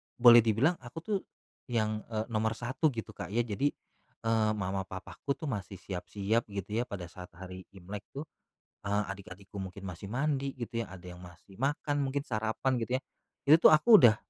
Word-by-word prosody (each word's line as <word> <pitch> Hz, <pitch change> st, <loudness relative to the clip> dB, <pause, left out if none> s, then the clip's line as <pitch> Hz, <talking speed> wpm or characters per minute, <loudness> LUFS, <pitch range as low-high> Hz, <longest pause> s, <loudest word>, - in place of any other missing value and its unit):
boleh 120 Hz, -1 st, +9 dB
dibilang 115 Hz, -, +3 dB
aku 120 Hz, +5 st, -12 dB
tuh 205 Hz, -3 st, 0 dB, 0.5 s
yang, 110 Hz, -3 st, 0 dB
eee, 110 Hz, -1 st, -2 dB
nomor 110 Hz, 0 st, +1 dB
1 130 Hz, +7 st, 0 dB
gitu, 115 Hz, -1 st, -5 dB
Kak, 90 Hz, -, -6 dB
ya. 115 Hz, +6 st, +1 dB
Jadi, 120 Hz, +5 st, 0 dB, 0.6 s
eee, 110 Hz, -1 st, +3 dB
mama 95 Hz, -1 st, -2 dB
papaku 95 Hz, +8 st, -4 dB
tuh 155 Hz, -5 st, -4 dB
masih 100 Hz, -2 st, -4 dB
siap-siap, 100 Hz, +5 st, -2 dB
gitu 100 Hz, +2 st, -3 dB
ya, 120 Hz, -, +2 dB
pada 90 Hz, -5 st, -6 dB
saat 90 Hz, -1 st, -9 dB
hari 95 Hz, 0 st, -9 dB
Imlek 100 Hz, +2 st, -8 dB
tuh, 140 Hz, -, -3 dB, 0.6 s
eee, 105 Hz, +1 st, +2 dB
adik-adikku 100 Hz, 0 st, -9 dB
mungkin 95 Hz, +1 st, -6 dB
masih 90 Hz, +1 st, -6 dB
mandi, 135 Hz, +3 st, -1 dB
gitu 120 Hz, -2 st, -4 dB
ya, -, -, -10 dB
ada 90 Hz, -, -13 dB
yang 90 Hz, -, -11 dB
masih 90 Hz, +2 st, -14 dB
makan, 145 Hz, +2 st, 0 dB
mungkin 140 Hz, +1 st, -1 dB
sarapan, 110 Hz, +2 st, 0 dB
gitu 120 Hz, +2 st, -1 dB
ya. -, -, -30 dB, 0.4 s
Itu 155 Hz, +4 st, +8 dB
tuh -, -, +7 dB
aku 215 Hz, +7 st, +8 dB
udah, 110 Hz, -3 st, +8 dB
110 Hz, 185 wpm, -31 LUFS, 95-125 Hz, 0.6 s, boleh